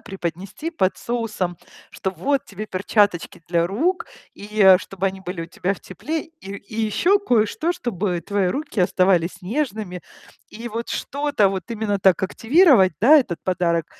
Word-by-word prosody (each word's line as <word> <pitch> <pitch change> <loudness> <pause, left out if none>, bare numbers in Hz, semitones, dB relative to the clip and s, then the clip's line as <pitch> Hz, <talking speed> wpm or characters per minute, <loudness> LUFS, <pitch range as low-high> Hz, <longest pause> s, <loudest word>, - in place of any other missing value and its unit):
преподнести 195 - -5
под 190 - 0
соусом, 215 -7 -3 0.3
что: 190 - -3
"Вот 260 - -1
тебе 210 +2 -8
перчаточки 195 -3 0
для 170 -1 +2
рук 320 - -1 0.3
и, 210 +1 -6
э, 190 -2 +8
чтобы 195 0 -4
они 190 0 -3
были 180 -2 -5
у - - -7
тебя 185 +2 -2
в - - -15
тепле, 300 - -4
и 325 - -22 0.3
и 215 +3 -7
еще 275 - +2
кое-что, 245 - +1
чтобы 195 - -2
твои 200 -2 0
руки 270 - -3
оставались 185 0 +2
нежными". 210 - -3 0.5
И 230 +2 -9
вот 230 +1 -5
что-то 285 -7 0
вот 190 +3 -5
именно 215 -3 -1
так 190 0 +4
активировать, 230 - +4
да, 295 +8 +7
этот 180 - -2
подарок 170 -3 0
200 Hz, 160 wpm, -22 LUFS, 185-235 Hz, 0.5 s, э